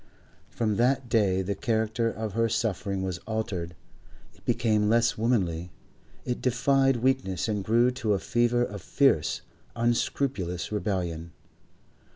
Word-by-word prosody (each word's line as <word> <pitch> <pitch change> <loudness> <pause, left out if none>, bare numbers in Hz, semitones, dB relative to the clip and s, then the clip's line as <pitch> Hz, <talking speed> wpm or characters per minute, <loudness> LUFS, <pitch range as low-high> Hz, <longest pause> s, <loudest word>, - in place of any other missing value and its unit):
From 110 -4 -1
that 125 +1 +2
day 95 -5 +2
the 100 +2 -1
character 110 +2 0
of 110 -2 -5
her 115 +1 +1
suffering 100 -3 -1
was 90 -2 -3
altered; 95 -6 -3 0.6
it - - -25
became 110 -3 +2
less 115 +1 +3
womanly, 90 -7 0 0.6
it 125 -1 -2
defied 135 +2 +3
weakness 120 -7 0
and 105 -3 -1
grew 120 +4 +3
to 115 -4 -1
a 100 - +1
fever 120 0 +1
of 100 -5 -5
fierce, 135 - +2 0.3
unscrupulous 115 -6 -1
rebellion. 85 -6 -2
110 Hz, 130 wpm, -27 LUFS, 95-120 Hz, 0.6 s, less